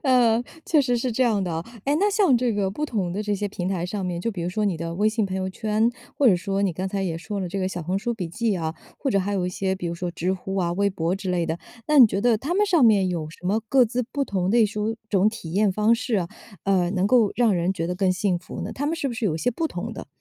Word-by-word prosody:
呃， 245 -4 +4 0.2
确 310 -3 +4
实 245 -3 +1
是 240 0 -1
这 255 - +1
样 215 -5 +2
的 175 -3 -2
啊。 165 +1 -3 0.2
哎， 285 +2 +2
那 410 +1 +3
像 385 - +4
这 240 -1 +1
个 200 -2 0
不 300 +9 -3
同 190 -9 -2
的 205 +3 -2
这 210 -1 -1
些 205 +1 -2
平 185 -2 -4
台 180 -3 -1
上 190 +1 -3
面， 175 -1 -2
就 230 - -1
比 180 -5 -5
如 175 - -1
说 210 +3 -1
你 190 -5 0
的 165 +1 -4
微 205 +4 +1
信 215 -2 0
朋 190 0 -4
友 190 0 -2
圈， 220 +3 +1 0.3
或 280 - +3
者 200 - +7
说 195 +2 -2
你 190 -3 +1
刚 185 +3 -3
才 195 0 -2
也 165 -3 -2
说 205 +3 -5
了 180 - -3
这 195 +2 -4
个 185 0 0
小 175 -3 -5
红 185 +4 -1
书 235 +3 -2
笔 185 -6 -4
记 210 +2 -1
啊， 160 -1 -3 0.2
或 275 - -1
者 200 - +3
还 200 +2 -2
有 185 -2 0
一 - - -1
些 190 +1 -1
比 180 -2 -5
如 170 - -2
说 175 +1 -3
知 180 +2 -1
乎 190 +1 -4
啊， 175 -2 +1
微 200 +2 +1
博 175 -1 -1
之 195 -1 -4
类 175 -2 +1
的。 165 +1 -2 0.3
那 300 -1 +4
你 245 - +10
觉 200 -1 -2
得 235 -2 +3
他 300 +9 -2
们 415 +2 +3
上 350 -8 +3
面 200 -4 +5
有 165 -4 -3
什 170 - -15
么 215 +4 +1
各 260 -2 +5
自 245 +2 -1
不 275 +4 -2
同 190 -4 -1
类 230 0 +5
书 210 +2 -2
种 200 +1 +4
体 215 -8 -7
验 205 +1 +3
方 215 +4 +3
式 235 0 -2
啊， 175 -3 -1 0.4
呃， 185 -3 +2
能 190 0 +1
够 225 -3 +4
让 235 -4 +4
人 175 +2 +1
觉 165 -3 -3
得 180 - -2
更 190 0 +1
幸 185 -1 0
福 175 - -8
呢？ 195 - -5
他 285 +2 -3
们 330 +2 -1
是 285 -4 -1
不 - - -4
是 225 - -3
有 160 - 0
一 - - -3
些 245 - +1
不 320 +6 -2
同 - - -5
的？ - - -8
200 Hz, 335 characters per minute, -24 LUFS, 180-230 Hz, 0.4 s, 你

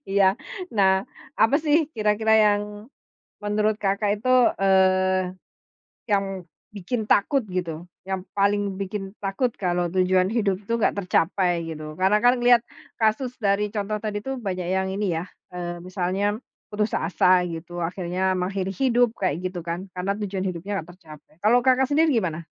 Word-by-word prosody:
Iya. 195 0 +3 0.4
Nah, 190 -1 +4 0.4
apa 225 +6 +5
sih 310 0 +2
kira-kira 215 0 +1
yang 205 -1 +4 0.8
menurut 210 +1 +1
Kakak 205 +1 0
itu, 255 - -3 0.3
eee, 185 -1 +3 0.8
yang 195 -2 -1 0.3
bikin 210 +3 -3
takut 245 +9 +3
gitu, 175 -2 -4 0.2
yang 190 0 -4
paling 200 0 +1
bikin 195 +1 -5
takut 195 +6 0
kalau 175 -2 0
tujuan 185 +1 +2
hidup 200 -3 0
itu 210 +3 -5
nggak 230 - +1
tercapai, 180 -1 +1
gitu? 155 -1 -7
Karena 190 +4 +3
kan 245 +1 +6
ngelihat 240 -1 +5 0.4
kasus 225 +3 +1
dari 205 -1 +1
contoh 210 0 -2
tadi 210 -1 -2
tuh 265 +5 -4
banyak 185 -3 -3
yang 190 0 0
ini 195 -3 -1
ya, 165 - -3 0.3
eee, 175 -1 -4
misalnya 185 +3 -1 0.3
putus 210 0 -1
asa 180 +2 +3
gitu 170 +1 -7
akhirnya 180 +2 -1
mengakhiri 190 +1 -2
hidup, 245 -3 +2
kayak 180 -5 -1
gitu 180 -2 -7
kan. 170 +3 -4
Karena 180 +2 -1
tujuan 195 -2 -3
hidupnya 185 +1 -4
nggak 165 - -18
tercapai. 155 -5 -15
Kalau 235 +5 +3
Kakak 260 0 +3
sendiri 310 +3 +3
gimana? 175 - -1
195 Hz, 150 wpm, -24 LUFS, 180-210 Hz, 0.8 s, kan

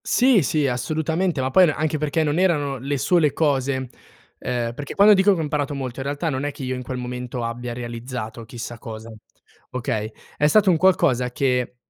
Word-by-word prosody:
Sì, 250 -5 +4
sì, 145 +1 +1
assolutamente, 155 +6 -1
ma 130 +1 -1
poi 185 +4 +6
n 155 - +1
anche 155 -1 -1
perché 155 +2 0
non 150 +2 0
erano 145 -7 +1
le 140 +3 -2
sole 150 +2 +2
cose, 135 -4 0 0.5
ehm, 120 -2 -2
perché 140 +3 -7
quando 205 +1 +7
dico 195 +1 +4
che - - -4
ho - - -1
imparato 145 -1 -2
molto 130 -2 -5
in 135 - -4
realtà 145 +4 -2
non 130 0 -3
è 145 - -1
che 140 - -9
io 130 0 -2
in 125 - -4
quel 125 0 -5
momento 125 0 -5
abbia 120 +1 -4
realizzato 120 -1 -6
chissà 120 0 -8
cosa. 110 0 -8 0.6
Okay? 110 -3 -3 0.3
È 150 - +3
stato 200 +3 +5
un 170 - +3
qualcosa 130 -9 +2
che, 125 -1 0
135 Hz, 200 wpm, -22 LUFS, 125-155 Hz, 0.6 s, quando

